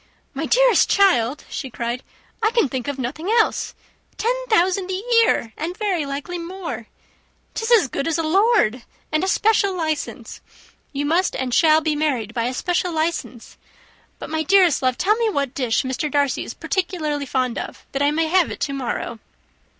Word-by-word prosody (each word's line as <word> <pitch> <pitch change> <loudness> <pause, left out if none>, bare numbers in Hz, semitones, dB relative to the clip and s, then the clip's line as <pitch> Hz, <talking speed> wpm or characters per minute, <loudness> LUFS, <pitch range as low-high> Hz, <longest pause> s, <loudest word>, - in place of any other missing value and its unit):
"My - - -3
dearest - - +4
child," 295 - +3
she 265 - -5
cried, 235 +1 -4 0.4
"I 435 - +3
can 465 -8 +2
think 255 -1 -4
of 285 -1 -3
nothing 285 +8 -4
else. 450 0 +1 0.4
Ten 465 +3 +1 0.2
thousand 375 -2 +2
a 375 - -1 0.3
year, 230 - +1
and 340 +4 -4
very 370 -9 -1
likely 285 +6 -5
more! 350 +1 -6 0.7
'Tis 450 0 -3
as 445 - +6
good 275 - -3
as 330 - 0
a 330 - -1
lord! 345 - +3 0.3
And 310 +3 +1
a - - 0
special 400 -1 +2
licence 315 -3 -4 0.5
you 285 0 -2
must 340 +5 +1
and 255 -2 -2
shall 315 +1 +5
be 310 -1 0
married 260 -8 -1
by 230 -2 -1
a 250 - -2
special 355 +4 -1
licence. 315 -7 -3 0.6
But, - - -8
my 315 0 0
dearest 360 -1 +4
love, 255 -2 +1
tell 420 +3 +3
me 460 -1 +1
what 280 - -1
dish 245 -4 0
Mr. 260 +3 -2
Darcy 285 -2 +1
is - - -8
particularly 310 -7 -2
fond 255 -2 -1
of, - - -8
that 275 - -2
I 285 - +4
may 320 +2 +1
have 355 0 +3
it - - -7
to 280 - -1
morrow." 240 -3 -4
315 Hz, 180 wpm, -21 LUFS, 265-375 Hz, 0.7 s, as